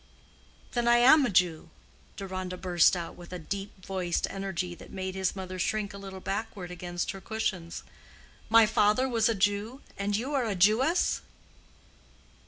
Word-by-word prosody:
"Then 240 Hz, -1 st, 0 dB
I 240 Hz, 0 st, +6 dB
am 270 Hz, +3 st, +6 dB
a -, -, -2 dB
Jew?" 175 Hz, -4 st, +1 dB, 0.5 s
Deronda 185 Hz, -2 st, -5 dB
burst 180 Hz, -1 st, +3 dB
out 170 Hz, -1 st, -6 dB
with 175 Hz, 0 st, -12 dB
a 180 Hz, -, -4 dB
deep 195 Hz, +2 st, -6 dB
voiced 185 Hz, -3 st, -1 dB
energy 190 Hz, -2 st, -3 dB
that -, -, -13 dB
made 190 Hz, -1 st, -4 dB
his 190 Hz, 0 st, -1 dB
mother 185 Hz, -1 st, -6 dB
shrink 210 Hz, +2 st, -1 dB
a 200 Hz, -, -8 dB
little 195 Hz, -1 st, -8 dB
backward 195 Hz, -2 st, -4 dB
against 175 Hz, 0 st, -4 dB
her 195 Hz, -, -9 dB
cushions. 190 Hz, -5 st, -3 dB, 0.7 s
"My 225 Hz, 0 st, +7 dB
father 215 Hz, +3 st, +3 dB
was 230 Hz, -3 st, +2 dB
a 230 Hz, -, +1 dB
Jew, 205 Hz, +6 st, 0 dB, 0.2 s
and 200 Hz, +1 st, 0 dB
you 260 Hz, +6 st, -3 dB
are 265 Hz, -4 st, +1 dB
a 210 Hz, -3 st, -1 dB
Jewess?" 225 Hz, -, +3 dB
195 Hz, 165 wpm, -29 LUFS, 180-220 Hz, 0.7 s, My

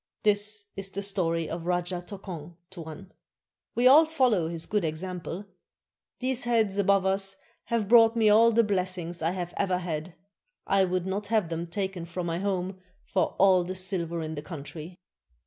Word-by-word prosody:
This 210 Hz, 0 st, +3 dB
is 195 Hz, 0 st, -2 dB
the 200 Hz, +1 st, -4 dB
story 170 Hz, -5 st, 0 dB
of 170 Hz, 0 st, -5 dB
Rajah 175 Hz, 0 st, -1 dB
Tokong, 175 Hz, -5 st, -8 dB, 0.2 s
Tuan. 170 Hz, +1 st, -9 dB, 0.6 s
We 240 Hz, -, +1 dB
all 300 Hz, +5 st, +8 dB
follow 250 Hz, -, +2 dB
his 165 Hz, -1 st, -4 dB
good 210 Hz, -2 st, 0 dB
example. 180 Hz, +3 st, -4 dB, 0.7 s
These 255 Hz, -1 st, 0 dB
heads 220 Hz, -4 st, +1 dB
above 195 Hz, -1 st, +3 dB
us 195 Hz, 0 st, +1 dB, 0.3 s
have 230 Hz, -3 st, -1 dB
brought 230 Hz, 0 st, +6 dB
me 225 Hz, -2 st, +3 dB
all 225 Hz, +2 st, +6 dB
the 230 Hz, +1 st, +4 dB
blessings 185 Hz, -4 st, -2 dB
I 160 Hz, -, +1 dB
have 175 Hz, -1 st, -4 dB
ever 185 Hz, -2 st, +1 dB
had; 165 Hz, -1 st, -5 dB, 0.5 s
I 195 Hz, -1 st, +3 dB
would 180 Hz, -1 st, -1 dB
not 200 Hz, +2 st, -3 dB
have 215 Hz, -6 st, +1 dB
them 165 Hz, +1 st, -4 dB
taken 190 Hz, -1 st, -4 dB
from 175 Hz, +1 st, -5 dB
my 170 Hz, 0 st, -2 dB
home 190 Hz, -1 st, -2 dB, 0.2 s
for 190 Hz, -, -1 dB
all 185 Hz, -2 st, +5 dB
the 185 Hz, +2 st, -5 dB
silver 175 Hz, -3 st, -2 dB
in 155 Hz, 0 st, -5 dB
the 145 Hz, -, -5 dB
country." 160 Hz, +2 st, -9 dB
185 Hz, 170 wpm, -27 LUFS, 170-205 Hz, 0.7 s, all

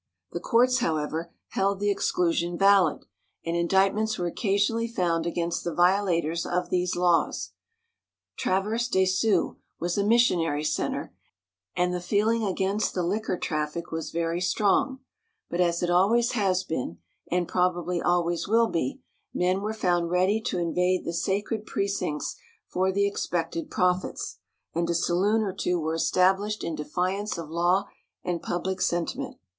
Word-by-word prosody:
The -, -, -3 dB
courts, 250 Hz, +2 st, +3 dB
however, 160 Hz, -3 st, -2 dB, 0.2 s
held 195 Hz, 0 st, 0 dB
the 205 Hz, 0 st, +2 dB
exclusion 175 Hz, -3 st, 0 dB
valid, 195 Hz, -4 st, +4 dB, 0.4 s
and 165 Hz, 0 st, -1 dB
indictments 195 Hz, +5 st, +2 dB
were 175 Hz, -, -2 dB
occasionally 205 Hz, +5 st, 0 dB
found 170 Hz, -7 st, 0 dB
against 170 Hz, 0 st, -2 dB
the 170 Hz, -, -3 dB
violators 175 Hz, -3 st, +2 dB
of 180 Hz, 0 st, -2 dB
these 180 Hz, 0 st, +1 dB
laws. 175 Hz, -1 st, +1 dB, 0.8 s
Traverse 215 Hz, +5 st, 0 dB
des 190 Hz, -5 st, +2 dB
Sioux 190 Hz, 0 st, +1 dB, 0.2 s
was 175 Hz, +4 st, -1 dB
a -, -, +2 dB
missionary 175 Hz, -10 st, +3 dB
center, 155 Hz, -, -2 dB, 0.6 s
and 180 Hz, 0 st, +1 dB
the 180 Hz, -, -2 dB
feeling 215 Hz, +5 st, +1 dB
against 195 Hz, +1 st, 0 dB
the 180 Hz, -, 0 dB
liquor 195 Hz, +1 st, -1 dB
traffic 155 Hz, 0 st, -3 dB
was 160 Hz, -1 st, -3 dB
very 170 Hz, +1 st, -1 dB
strong, 215 Hz, +8 st, +1 dB, 0.5 s
but, 175 Hz, -, 0 dB
as 170 Hz, 0 st, +1 dB
it 175 Hz, -, +1 dB
always 225 Hz, +7 st, +3 dB
has 190 Hz, -6 st, +1 dB
been, 125 Hz, -, -4 dB, 0.3 s
and 175 Hz, 0 st, 0 dB
probably 180 Hz, -1 st, 0 dB
always 175 Hz, 0 st, +1 dB
will 225 Hz, +2 st, +3 dB
be, 135 Hz, -6 st, -2 dB, 0.3 s
men 185 Hz, +2 st, +1 dB
were 210 Hz, +1 st, -2 dB
found 175 Hz, -6 st, 0 dB
ready 185 Hz, +5 st, +2 dB
to 220 Hz, -, -2 dB
invade 180 Hz, +2 st, +1 dB
the 170 Hz, -, -3 dB
sacred 205 Hz, +5 st, -2 dB
precincts 195 Hz, -7 st, -2 dB, 0.3 s
for 185 Hz, +1 st, 0 dB
the 200 Hz, +1 st, +2 dB
expected 170 Hz, -4 st, -2 dB
profits, 180 Hz, 0 st, -1 dB, 0.3 s
and 170 Hz, +1 st, -1 dB
a 170 Hz, -, +1 dB
saloon 195 Hz, +6 st, +2 dB
or 195 Hz, -3 st, -2 dB
two 180 Hz, -1 st, -1 dB
were 160 Hz, 0 st, -1 dB
established 190 Hz, +5 st, +2 dB
in 165 Hz, -, -2 dB
defiance 185 Hz, +7 st, -2 dB
of 160 Hz, -2 st, -7 dB
law 175 Hz, +3 st, +2 dB, 0.4 s
and 175 Hz, -2 st, -2 dB
public 185 Hz, +2 st, -3 dB
sentiment. 175 Hz, -1 st, -1 dB
180 Hz, 150 wpm, -26 LUFS, 170-200 Hz, 0.8 s, valid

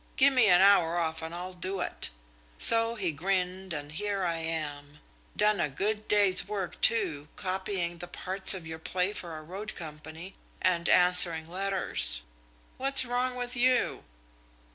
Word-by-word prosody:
'Give 275 Hz, +1 st, +2 dB
me 250 Hz, -4 st, +3 dB
an 180 Hz, -1 st, +3 dB
hour 180 Hz, -4 st, +2 dB
off, 160 Hz, -1 st, -4 dB
and 160 Hz, 0 st, -8 dB
I'll 180 Hz, +1 st, -9 dB
do 185 Hz, +2 st, -5 dB
it.' -, -, -4 dB, 0.5 s
So 230 Hz, 0 st, +7 dB
he 190 Hz, -7 st, -3 dB
grinned, 185 Hz, +3 st, -5 dB
and 145 Hz, -2 st, -7 dB
here 200 Hz, +4 st, -5 dB
I 170 Hz, -2 st, -3 dB
am. 150 Hz, -3 st, -7 dB, 0.4 s
Done 210 Hz, 0 st, 0 dB
a 150 Hz, -, -2 dB
good 210 Hz, +9 st, -5 dB
day's 200 Hz, -3 st, +4 dB
work, 200 Hz, -3 st, -7 dB
too, 170 Hz, -11 st, 0 dB
copying 185 Hz, -2 st, -5 dB
the 175 Hz, -, -9 dB
parts 190 Hz, +2 st, +5 dB
of 180 Hz, -3 st, -10 dB
your 160 Hz, 0 st, -10 dB
play 180 Hz, +4 st, -4 dB
for 170 Hz, -5 st, -9 dB
a 155 Hz, -, -12 dB
road 195 Hz, +7 st, -10 dB
company, 160 Hz, +2 st, -11 dB, 0.3 s
and 175 Hz, -2 st, -2 dB
answering 180 Hz, -3 st, +6 dB
letters. 180 Hz, -, -2 dB, 0.5 s
What's 270 Hz, 0 st, +4 dB
wrong 250 Hz, +1 st, -4 dB
with 245 Hz, 0 st, -6 dB
you?" 250 Hz, +1 st, -1 dB
185 Hz, 160 wpm, -26 LUFS, 165-205 Hz, 0.5 s, So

